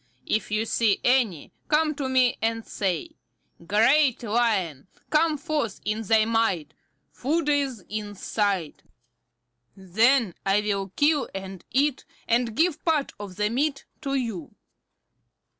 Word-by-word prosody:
If 215 - -1
you 215 +1 0
see 225 -2 +2
any, 240 - +1
come 310 0 +2
to 280 -2 -3
me 255 -1 +3
and 225 0 -1
say: 205 - -3 0.5
'Great 235 - +3
Lion, 205 - 0 0.2
come 310 0 +3
forth 290 - -2
in 215 +1 -1
thy 220 0 +3
might. 195 -9 0 0.4
Food 310 +4 -1
is 275 -8 0
in 210 -1 -5
sight.' 195 -5 -1 0.9
Then 220 +3 +2
I 195 +2 +2
will 200 -2 -2
kill 290 -1 +2
and 190 -2 -7
eat, 280 +1 +1 0.2
and 235 -1 +1
give 325 0 +1
part 310 -4 0
of 200 -3 -8
the 210 +2 0
meat 275 +3 -1 0.2
to 275 -2 -2
you." 225 - -4
230 Hz, 130 wpm, -25 LUFS, 200-280 Hz, 0.9 s, me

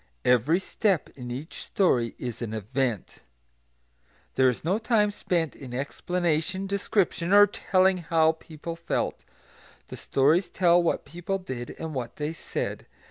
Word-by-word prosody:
Every 125 +7 +4
step 195 -1 0
in 125 -2 -9
each 135 +7 -6
story 125 - +1
is 120 -2 -5
an 110 -2 -3
event. 115 0 -2 1.1
There 130 -1 +4
is 125 - -3
no 185 +7 +1
time 220 -3 +2
spent 170 -6 -1
in 125 -3 -8
explanation, 175 +6 -1
description, 195 -3 0
or 205 +1 +9
telling 190 -1 +2
how 160 -2 +3
people 160 +1 -8
felt; 170 0 -2 0.7
the - - -7
stories 155 +7 +2
tell 175 -1 +4
what 170 - 0
people 175 +6 -3
did, 130 -10 -6
and 160 -1 -5
what 125 -4 -4
they 150 +1 -3
said. - - -4
165 Hz, 140 wpm, -27 LUFS, 130-185 Hz, 1.1 s, or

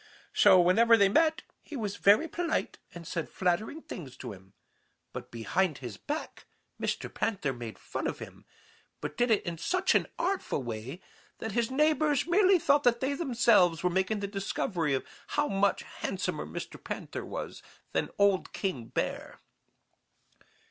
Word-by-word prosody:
So 190 -3 +7
whenever 225 +7 +5
they 200 -2 +5
met 320 +8 +3 0.2
he 305 - -9
was 210 -5 -3
very 210 +11 +5
polite 335 0 -2 0.2
and 170 -1 -8
said 165 0 -3
flattering 190 - -1
things 140 -8 -8
to 125 -4 -6
him. 95 0 -16 0.6
But - - -7
behind 140 - 0
his 120 -5 -7
back 300 +2 -6 0.3
Mr. - - -2
Panther 185 -11 -1
made 120 -3 -7
fun - - -4
of - - -3
him, - - -11 0.5
but - - -5
did 245 0 +1
it 220 - +2
in 170 -2 -4
such 365 - +1
an - - +2
artful 365 - -1
way 120 +8 -6 0.4
that 225 - -4
his 230 +1 0
neighbors 300 +1 +2
merely 375 +2 +5
thought 285 -3 +3
that 240 -3 +3
they 270 +2 0
themselves 235 - +3
were 180 - +2
making 190 +3 0
the 200 - -2
discovery 190 -6 -1
of 130 - -3 0.3
how 295 0 +3
much 200 -2 +1
handsomer - - -4
Mr. - - -7
Panther - - -5
was - - -6 0.3
than - - -1
old 200 -2 +2
King 185 - -3
Bear. - - -3
200 Hz, 160 wpm, -30 LUFS, 170-280 Hz, 0.6 s, So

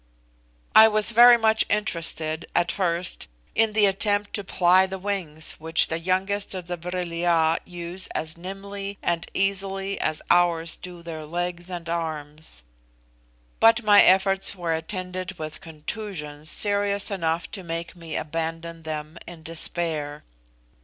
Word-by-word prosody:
I 220 0 +10
was 215 +1 +4
very 240 +1 +8
much 220 -1 +3
interested 165 -5 -2
at 175 0 +2
first 175 -2 0 0.3
in 225 -1 +2
the 215 -1 +4
attempt 205 +1 +1
to 205 - -1
ply 185 0 +4
the 190 0 -5
wings 180 -6 -3
which 160 +1 +3
the 165 - -2
youngest 190 +3 -1
of 185 -2 -6
the 175 0 -3
Vril 175 0 -5
ya 170 -1 +2
use 175 +1 -5
as 155 0 -3
nimbly 195 +2 -7
and 170 -1 -1
easily 195 0 0
as 155 -1 -1
ours 170 -2 +3
do 175 -2 -10
their 160 -2 -7
legs 175 +2 -3
and 175 -2 -6
arms; 155 - -4 1.0
but 225 +1 +5
my 205 -1 +7
efforts 195 +1 +4
were 170 -3 -2
attended 185 +2 -5
with 155 -1 -7
contusions 155 -2 -6
serious 200 +1 0
enough 165 -3 -2
to 205 - -5
make 170 0 -5
me 165 -3 -7
abandon 165 +1 -4
them 155 +1 -6
in 170 -2 -10
despair. 160 -2 -1
175 Hz, 140 wpm, -24 LUFS, 165-195 Hz, 1.0 s, I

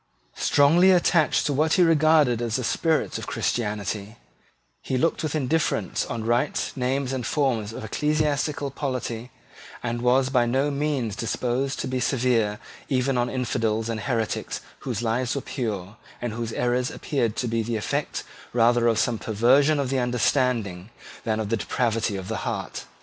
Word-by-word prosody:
Strongly 160 +6 +5
attached 175 -4 +3
to 145 - +1
what 155 +3 +2
he 185 - +5
regarded 155 -7 +4
as 115 -2 -1
the 130 - -1
spirit 160 +5 0
of - - -7
Christianity, 105 -1 -2 0.7
he 130 - -2
looked 165 +6 +1
with 155 -1 -2
indifference 140 - 0
on 115 -1 -4
rites, 120 +5 0
names, 135 +1 -1
and 130 -2 -2
forms 120 -5 0
of 110 - -7
ecclesiastical 150 +3 0
polity, 125 -4 -4 0.5
and 120 0 -2
was 130 +2 +3
by 120 -3 +3
no 135 +4 +1
means 140 -7 -1
disposed 125 +4 -1
to - - -3
be 130 0 -1
severe 120 -5 +1 0.3
even 130 -1 +1
on 120 0 +1
infidels 115 -3 -1
and 115 -1 -2
heretics 110 0 -2 0.2
whose 120 -4 -3
lives 120 +3 0
were 140 - -2
pure, 110 -7 -4 0.2
and 120 -3 -3
whose 115 0 -4
errors 125 +1 0
appeared 120 -7 -1
to 125 - -1
be 115 0 0
the 115 +1 -2
effect 105 - -2 0.3
rather 120 0 +4
of 115 -2 +3
some 115 0 +1
perversion 130 +8 +3
of 135 -2 -1
the 135 - +1
understanding 120 -6 0 0.4
than 110 -1 0
of 110 -2 -2
the 115 - +1
depravity 115 -2 0
of 95 -1 -5
the 110 +1 -2
heart. - - -4
125 Hz, 165 wpm, -25 LUFS, 115-140 Hz, 0.7 s, Strongly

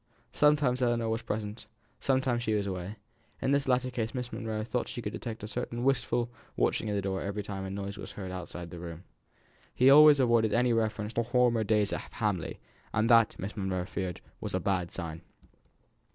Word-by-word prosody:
Sometimes 145 -4 +3
Ellinor 120 -2 +1
was 115 +1 -1
present, 110 -1 -4 0.3
sometimes 130 -3 +1
she 110 -2 0
was 100 -1 0
away; 95 +1 -4 0.4
in 135 - 0
this 140 -1 +2
latter 130 0 +2
case 115 0 -3
Miss 125 -2 -4
Monro 110 -2 -3
thought 120 +2 -2
she - - -5
could - - -4
detect 110 -3 -6
a - - -4
certain 120 +1 -3
wistful 120 -2 +1 0.3
watching - - +1
of 105 - 0
the 100 - -1
door 95 -1 -1
every 100 +1 -3
time 95 -1 -5
a - - -4
noise 100 +1 -5
was - - -8
heard 95 -2 -6
outside 90 -2 -6
the 85 - -7
room. 85 0 -8 0.7
He 130 +2 +6
always 150 0 +9
avoided 115 -4 +3
any 120 0 +3
reference 110 -1 -1
to 115 - +1
former 120 -1 +3
days 105 -1 +2
at - - -6
Hamley, - - -2 0.3
and 110 +1 +1
that, 115 -2 +5
Miss 95 +3 -5
Monro 95 -3 -2
feared, 95 -2 -4 0.2
was - - -3
a - - +1
bad 90 -3 0
sign. 80 -2 -6
110 Hz, 195 wpm, -30 LUFS, 100-125 Hz, 0.7 s, always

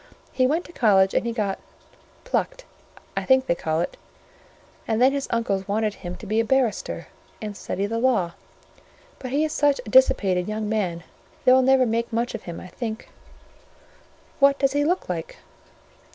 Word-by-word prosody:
He 255 -1 +2
went 320 +6 0
to - - -12
college, 195 - +4
and - - 0
he - - 0
got—plucked, 230 - -5 0.5
I - - -1
think 260 0 +4
they - - +2
call 160 -1 -1
it: 175 - -4 0.9
and 220 -1 0
then 255 +2 +5
his 280 0 -2
uncles 200 -5 -1
wanted 210 +1 0
him 180 -3 -7
to - - -11
be 215 +2 0
a - - +3
barrister, 245 -2 -1 0.3
and 210 -1 -6
study 200 0 -3
the 230 +2 -2
law: 230 -9 +2 0.9
but 255 - -6
he 285 +4 +1
is 310 - -3
such 285 -2 +2
a - - -7
dissipated 190 -8 +4
young 215 0 -3
man, 185 -6 -1 0.4
they 255 - +7
will 260 - +6
never 260 0 +4
make 230 0 -1
much 235 +2 -1
of 225 - -5
him, 170 - -6
I - - -10
think." 220 +2 -6 1.3
"What 280 0 +5
does 275 -1 +2
he 290 0 +2
look 355 +5 0
like?" 170 -3 -5
230 Hz, 180 wpm, -24 LUFS, 200-260 Hz, 1.3 s, they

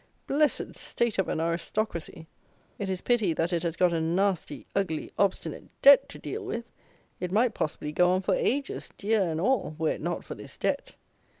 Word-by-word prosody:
Blessed 295 +1 +1
state 235 -4 -1
of 190 - +1
an - - -1
Aristocracy! 170 0 -2 0.5
It 200 - -2
is 185 -1 -2
pity 225 -8 +2
that 165 +3 0
it 170 - +1
has 170 -2 -2
got 180 0 +3
a 165 - +1
nasty, 175 -3 0
ugly, 185 -6 -1
obstinate 200 -2 0 0.2
DEBT 280 0 +9
to - - -10
deal 430 - -5
with! 235 -12 -4 0.5
It 180 -1 -3
might 225 +3 +3
possibly 150 -3 -3
go 180 +3 +4
on 185 +1 +2
for - - +2
ages, 275 +3 -1
deer 215 +1 +2
and 165 -4 0
all, 205 -5 +1
were 160 -1 +1
it - - -4
not - - -3
for - - -6
this - - -10
DEBT. - - -2
185 Hz, 190 wpm, -28 LUFS, 165-225 Hz, 0.5 s, DEBT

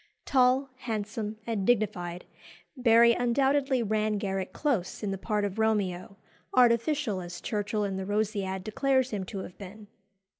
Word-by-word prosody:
Tall, 260 +1 +3
handsome, 215 -2 -4
and 225 -4 -2
dignified, 190 -6 0 0.5
Barry 235 -2 +5
undoubtedly 265 +2 +2
ran 215 0 0
Garrick 195 -2 -3
close 230 - -2
in 200 - -1
the 195 - -3
part 210 0 -1
of 200 +2 -4
Romeo, 200 -4 0 0.4
artificial 240 -3 +3
as 175 0 -7
Churchill 210 +1 -2
in 195 -1 -2
the 190 - -4
Rosciad 200 -3 -1
declares 260 +4 +1
him 200 -3 -3
to 190 0 -6
have 180 - -11
been. 205 +2 -10
215 Hz, 145 wpm, -28 LUFS, 195-245 Hz, 0.5 s, Barry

